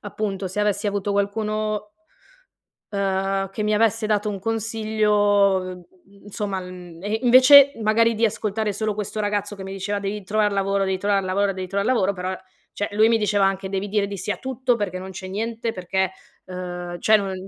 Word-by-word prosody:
appunto 200 -2 -4
se 190 - -6
avessi 210 0 +1
avuto 200 0 -2
qualcuno 210 +1 -1 1.0
uhm, 195 -1 -1
che 210 +2 -4
mi 210 0 +1
avesse 225 0 +2
dato 210 0 0
un 200 -1 -3
consiglio, 205 -4 +1 0.4
insomma 200 -1 -4
mhmm, 180 -2 -10
e 210 +2 -1
invece 265 +3 +8
magari 230 +2 +3
di 225 +1 +1
ascoltare 215 0 -1
solo 215 +1 -2
questo 210 +1 -5
ragazzo 205 0 -2
che 195 - -8
mi 195 - -6
diceva: 200 +1 -3
"Devi 200 +1 -4
trovar 210 +1 +1
lavoro, 195 0 0
devi 190 -1 -1
trovar 200 -1 +1
lavoro, 195 +2 +1
devi 185 -1 -5
trovar 200 +3 -2
lavoro", 200 -6 +2
però, 185 0 -4 0.4
cioè 205 - -3
lui 215 +2 +4
mi 230 - +3
diceva 205 -2 +2
anche: 195 0 -2
"Devi 195 +1 -3
dire 205 0 +1
di 200 0 -6
sì 190 +2 -4
a - - 0
tutto, 260 -1 -1
perché 190 -4 -3
non 190 +1 -8
c'è 190 0 -8
niente, 225 +3 -3
perché, 190 +1 -1 0.3
ehm, 180 -1 -6
cioè 215 - +5
non 195 -2 -3
205 Hz, 185 wpm, -23 LUFS, 190-215 Hz, 1.0 s, invece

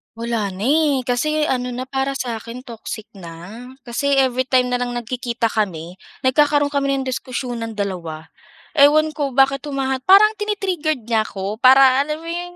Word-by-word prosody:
Wala 230 -3 -2
na 195 +5 -4
eh, 295 -1 +3
kasi 305 +5 0
ano 250 -1 -1
na 255 +1 -5
para 270 +1 -1
sa 240 -3 -3
akin 230 +3 -9
toxic 220 -2 -7
na. 180 +5 -10 0.2
Kasi 280 +4 -1
every 255 -1 +1
time 255 -1 +2
na 250 - -1
lang 245 0 -2
nagkikita 240 0 -2
kami, 180 -6 -3 0.2
nagkakaroon 290 +2 +3
kami 275 -1 0
ng 265 - -4
diskusyonan 245 -2 -4
dalawa. 170 -5 -4 0.5
Ewan 305 +1 +4
ko 285 -3 -2
bakit 270 +1 +2
humaha 265 -3 -2
parang 420 +5 +6
tini-triggered 365 - -2
niya 225 -2 +2
ako, 200 0 -5
para 265 +1 +6
alam 300 +1 -4
mo 330 - -11
'yong, 350 +1 -5
255 Hz, 165 wpm, -20 LUFS, 230-290 Hz, 0.5 s, parang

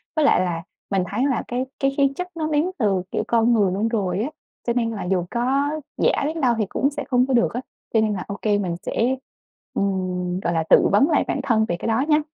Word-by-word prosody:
với 310 -2 +3
lại 280 - +5
là 170 -2 -2 0.3
mình 195 -2 +1
thấy 235 +6 0
là 260 - 0
cái 250 +1 -2
cái 275 0 +2
khí 275 -1 +4
chất 360 +3 -3
nó 310 -1 -1
đến 310 +4 +1
từ, 200 -6 +1
kiểu, - - -1
con 235 0 +3
người 205 -5 +3
luôn 205 +4 0
rồi 195 -5 -1
á, 275 - -2 0.4
cho 235 - +2
nên 230 -2 0
là 215 - -4
dù 180 -1 0
có 270 +4 +1 0.3
giả - - +2
đến 315 +2 -2
đâu 245 -3 +3
thì 215 - +1
cũng 275 - +1
sẽ 290 0 -4
không 250 -1 +3
có 265 - 0
được 235 - +3
á. 245 - -2 0.3
Cho 220 - +4
nên 215 -1 +1
là 185 - -3
ô 200 -1 -5
kê, 210 -2 +2
mình 180 -4 -2
sẽ, 250 +3 0 0.6
ừm, 185 -2 -1
gọi 170 -2 -1
là, 165 -1 +1
tự - - +6
vấn 210 - +4
lại 310 - +3
bản - - -1
thân 225 -5 +2
về 175 - -1
cái - - -4
đó 225 +4 +2
nhá. 300 -1 +4
230 Hz, 260 wpm, -23 LUFS, 195-270 Hz, 0.6 s, tự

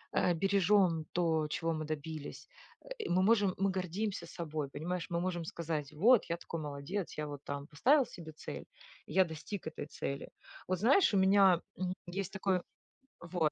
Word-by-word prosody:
э, 175 - +3
бережем 190 -2 +3
то, 160 -3 +2
чего 165 +1 0
мы 155 0 -3
добились, 155 - -6 0.3
э, - - -14 0.2
мы 185 +1 +3
можем, 205 -1 +4
мы 195 0 +2
гордимся 185 0 -2
собой, 155 -4 -4
понимаешь, 170 +4 -3
мы 170 0 0
можем 175 -2 -2
сказать: 155 -3 -3
вот, 225 +9 +5
я 170 - +1
такой 165 -2 -5
молодец, 150 +6 -4
я 150 - -1
вот 145 -1 -7
там 140 0 -4
поставил 255 - +4
себе 160 -3 -10
цель, 155 - -7 0.4
я 190 0 +4
достиг 160 +4 -6
этой 155 - -5
цели. 140 -2 -4 0.4
Вот 185 -1 +1
знаешь, 255 - +5
у - - +5
меня, 190 -2 +6 0.2
м, 185 -1 -1
есть 190 +1 -4
такое. 190 -2 0 0.6
Вот 170 -3 0
175 Hz, 170 wpm, -33 LUFS, 155-195 Hz, 0.6 s, меня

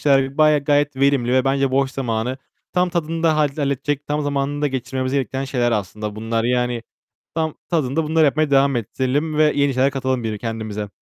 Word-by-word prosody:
şeyler 135 0 +2
bayağı, 155 -1 +5
gayet 145 -1 +2
verimli 135 -3 +2
ve 130 0 +3
bence 135 0 +1
boş 135 0 +1
zamanı. 125 0 -2 0.3
Tam 180 0 +2
tadında 165 -1 0
halle 150 -2 +1
halledecek, 140 0 -1
tam 150 0 -1
zamanında 145 +1 -1
geçirmemizi 130 0 -3
gerektiren 135 0 -2
şeyler 120 -3 0
aslında 105 +1 -3
bunlar. 115 +1 -1
Yani 125 -1 0 0.5
tam 160 -2 -1 0.2
tadında 155 -1 0
bunları 160 +1 +3
yapmaya 150 +1 +2
devam 140 -1 +4
ettirelim 135 +7 -1
ve 155 0 +4
yeni 140 -2 +2
şeyler 130 +2 +3
katalım 130 -2 -2
bir 110 -2 -2
kendimize. 110 -2 -4
135 Hz, 175 wpm, -21 LUFS, 125-145 Hz, 0.5 s, bayağı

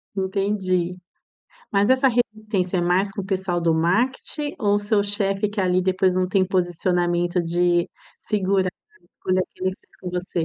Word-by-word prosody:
Entendi. 190 -2 -1 0.7
Mas 200 +2 +3
essa 260 +1 +5
resistência 215 -6 0
é - - +1
mais 185 +3 +2
com 200 - -4
o - - -8
pessoal 190 -2 -1
do 165 -1 +2
marketing, 255 - 0
ou 205 -2 +3
seu 205 0 +1
chefe 200 0 0
que 205 0 -4
ali 185 -1 +2
depois 185 0 +2
não 185 0 +1
tem 190 0 +2
posicionamento 175 -1 0
de 175 +1 +1 0.3
segurar 190 -2 +1 0.3
a - - -31
escolha 185 0 0
que 185 - -7
ele 185 0 0
fez - - -22
com 180 - -6
você? 180 -2 -2
185 Hz, 165 wpm, -23 LUFS, 180-205 Hz, 0.7 s, essa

